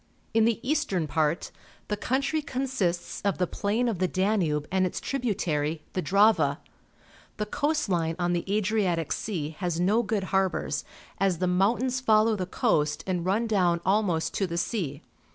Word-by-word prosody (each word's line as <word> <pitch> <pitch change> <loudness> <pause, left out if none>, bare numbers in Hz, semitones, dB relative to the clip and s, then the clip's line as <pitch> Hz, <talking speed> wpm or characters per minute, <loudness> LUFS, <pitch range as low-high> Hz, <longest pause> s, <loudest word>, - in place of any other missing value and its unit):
In 225 0 +4
the 230 -1 +1
eastern 230 - +1
part 155 +2 0 0.4
the 210 - -1
country 275 +8 0
consists 255 -11 -2
of 200 -1 0
the 180 - +2
plain 210 +7 -1
of 220 -7 -1
the 185 - +2
Danube 180 -7 0
and 190 0 +2
its 185 - -1
tributary, 165 - -1
the 185 - -1
Drave. 180 -5 +3 0.8
The 210 - -1
coast 300 +6 0
line 165 -3 0
on 175 -1 0
the 175 - 0
Adriatic 200 -6 0
Sea 160 -8 -2
has 175 -3 -1
no 205 +6 +3
good 210 -3 -1
harbours, 185 -6 0 0.4
as 190 -2 +2
the 185 - 0
mountains 225 +8 +1
follow 220 -2 +4
the 185 -3 -3
coast 150 -4 +1
and 180 -2 -1
run 210 +5 +2
down 180 -6 +2
almost 190 -4 +1
to 195 - 0
the 170 -1 -4
sea. 165 - -2
190 Hz, 165 wpm, -27 LUFS, 170-220 Hz, 0.8 s, In